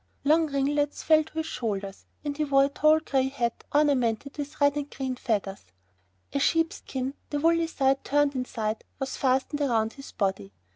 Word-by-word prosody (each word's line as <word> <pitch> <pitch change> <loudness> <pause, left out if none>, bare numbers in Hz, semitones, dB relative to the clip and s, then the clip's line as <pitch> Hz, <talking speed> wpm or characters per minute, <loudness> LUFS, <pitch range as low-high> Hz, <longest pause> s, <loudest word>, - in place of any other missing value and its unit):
Long 315 +3 +4
ringlets 290 +1 0
fell 315 0 +5
to - - -17
his 320 0 -1
shoulders 200 -8 -4 0.2
and 290 -1 -2
he 305 - 0
wore 275 -2 +4
a - - -1
tall 305 +2 +4
gray 265 -3 +1
hat 240 -4 -2
ornamented 280 -4 +1
with 290 0 -6
green 285 -1 +4
and 290 0 -5
red 260 -2 -2
feathers. 200 - -2 0.7
A 280 - +1
sheepskin, 280 -4 0 0.2
the 290 - -1
woolly 330 +1 +3
side 270 -3 +1
turned 290 0 +2
inside, 225 -4 -3
was 270 -1 -3
fastened 265 +2 +1
round 225 -6 +1
his 275 - -11
body. 190 - -2
275 Hz, 175 wpm, -27 LUFS, 245-290 Hz, 0.7 s, fell